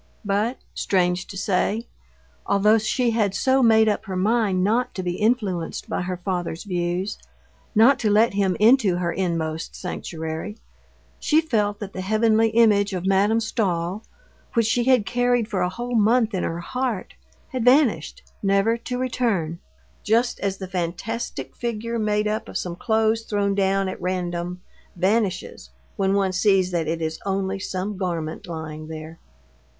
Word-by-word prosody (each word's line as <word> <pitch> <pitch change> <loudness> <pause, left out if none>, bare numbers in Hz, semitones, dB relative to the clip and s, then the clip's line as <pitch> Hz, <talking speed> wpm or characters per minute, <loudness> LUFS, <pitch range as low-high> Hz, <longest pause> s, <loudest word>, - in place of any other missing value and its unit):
But, 210 +5 0 0.2
strange 180 -1 0
to 195 - -8
say, 200 +4 0 0.6
although 210 +3 +4
she 235 +3 +1
had 210 -4 +1
so 265 0 +3
made 220 -2 +5
up 210 +1 0
her 190 -2 -4
mind 200 -1 +2
not 230 +5 +1
to 185 - -3
be 175 0 -2
influenced 210 -7 -1
by - - -2
her 180 0 -3
father's 175 -2 -3
views, 180 0 -2 0.6
not 250 +5 +6
to 215 - +1
let 215 +2 +4
him 195 -3 +1
into 220 -4 +5
her 175 -1 -1
inmost 165 -3 -2
sanctuary, 160 +2 -5 0.6
she 310 - +3
felt 215 -10 0
that 200 -1 -6
the 185 - -4
heavenly 220 +3 +3
image 210 -3 +3
of 180 -1 -3
Madame 200 +4 +3
Stahl, 195 -4 -1 0.5
which 230 -1 +3
she 235 +2 +1
had 255 -5 +4
carried 245 -1 +1
for 200 -5 -2
a 180 - +1
whole 240 +6 -5
month 225 +1 +3
in 185 - -1
her 165 +1 -3
heart, 250 +1 -3 0.4
had 255 -3 -3
vanished, 245 - +3 0.2
never 200 +3 +2
to 250 +1 -5
return, 225 -10 -1 0.4
just 235 +3 +1
as 195 -1 -2
the 190 - -6
fantastic 185 +6 -4
figure 230 0 -3
made 210 0 +1
up 215 +1 -2
of - - -3
some 175 -2 -4
clothes 220 +1 +1
thrown 205 -2 0
down 195 0 +1
at 185 - -6
random 180 -1 -3 0.3
vanishes 190 - -1 0.3
when 195 0 +1
one 195 -1 +2
sees 190 -1 +3
that 170 -3 -1
it 165 +1 -2
is 160 0 -3
only 195 0 -1
some 190 +2 -4
garment 170 -4 -3
lying 155 -2 -6
there. 160 +1 -8
200 Hz, 160 wpm, -23 LUFS, 180-225 Hz, 0.6 s, not